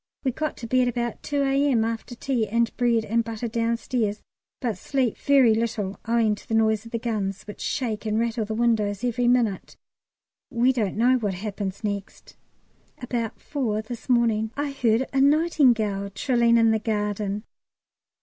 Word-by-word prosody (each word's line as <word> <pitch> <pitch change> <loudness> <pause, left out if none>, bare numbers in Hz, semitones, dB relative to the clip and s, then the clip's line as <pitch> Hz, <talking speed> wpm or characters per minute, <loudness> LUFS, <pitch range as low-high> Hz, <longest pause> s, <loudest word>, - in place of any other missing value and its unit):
We 265 - +1
got 305 +4 -3
to 235 - -7
bed 255 +2 +2
about 240 -1 -2
2 285 -1 -1
A.M. 270 -4 +2
after 230 +2 -4
tea 240 -3 -1
and 230 +2 0
bread 235 -3 +2
and 230 +2 +1
butter 230 +1 -4
downstairs, 230 -1 -1 0.4
but 225 -7 -2
slept 255 -2 -1
very 270 -5 +5
little 220 -3 -2
owing 230 -2 +3
to 205 - -10
the 225 - -1
noise 220 0 +2
of - - -13
the 230 - -1
guns, 210 -4 -3
which 210 - -10
shake 225 -4 -2
and 215 0 0
rattle 230 0 0
the 215 +1 -4
windows 220 -3 +1
every 245 0 0
minute. 240 -5 +1 0.7
We 250 0 +2
don't 210 -6 -1
know 250 +3 +4
what 205 -5 -2
happens 200 0 -5
next. 200 -2 -5 0.6
At - - -17
about 235 -3 -3
four 225 -7 -2
this 235 +3 -9
morning 225 -3 +2
I 290 0 -1
heard 245 -2 +1
a 270 - +3
nightingale 255 -10 +3
trilling 235 +3 +2
in 225 -1 +4
the 220 - +2
garden. 210 -1 -2
230 Hz, 170 wpm, -25 LUFS, 215-245 Hz, 0.7 s, very